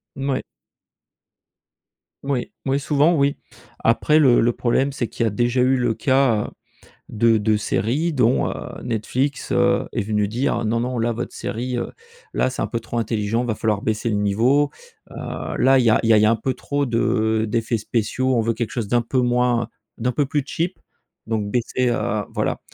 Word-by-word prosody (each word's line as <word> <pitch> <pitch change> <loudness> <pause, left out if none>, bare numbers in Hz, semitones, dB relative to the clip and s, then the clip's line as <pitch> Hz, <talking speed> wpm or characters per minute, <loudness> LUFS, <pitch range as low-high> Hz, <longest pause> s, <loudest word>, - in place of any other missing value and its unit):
Mouais. 135 -1 -1 1.8
Oui. 135 -3 -2
Oui, 135 +1 +2
souvent, 145 +4 +2
oui. 140 -2 +1 0.4
Après, 150 +7 +3
le 130 -6 +5
le 120 +1 +3
problème, 130 +4 0
c'est 120 -4 -3
qu'il 115 - -2
y - - +2
a - - +1
déjà 120 +4 +1
eu 130 +1 +3
le 120 -3 +1
cas 130 -4 +2 0.6
de 115 0 +3
de 105 0 +2
séries 125 +10 0
dont, 125 -3 +2
heu, - - -4 0.3
Netflix, 125 +5 -2
heu, - - +2
est - - -1
venu 105 0 0
dire: 120 +2 -1
«Non 115 +2 0
non, 125 +1 -2
là, 115 +1 +1
votre 120 +2 -5
série, 125 +2 -4
heu, - - -4 0.4
là, 130 - +1
c'est 130 - -5
un - - 0
peu 115 - -3
trop 120 - -4
intelligent, 110 0 -1
il - - -3
va 115 - 0
falloir 105 -1 -1
baisser 110 +1 -1
le 105 - 0
niveau. 120 +9 +2 0.4
Heu, - - -5
là, 135 0 +5
il 125 - +3
y 115 - +5
a 110 - +4
il 115 - 0
y - - +6
a - - +7
il 105 - +4
y - - +5
a - - +5
un - - +4
peu 130 +4 -2
trop 145 0 -2
de 110 -2 +1
d'effets 115 +2 0
spéciaux, 125 +4 -1
on 120 - +3
veut 115 +1 0
quelque 115 0 -3
chose 115 -5 -3
d'un 120 +2 +2
peu 130 +3 0
moins, 120 -1 +1 0.3
d'un 125 +2 0
peu 145 +2 0
plus 145 +2 0
cheap 170 +5 -3 0.5
donc 105 -2 -1
baissez, 125 +2 0
heu, 105 -3 -1
voilà.» - - -1
120 Hz, 205 wpm, -22 LUFS, 110-130 Hz, 1.8 s, a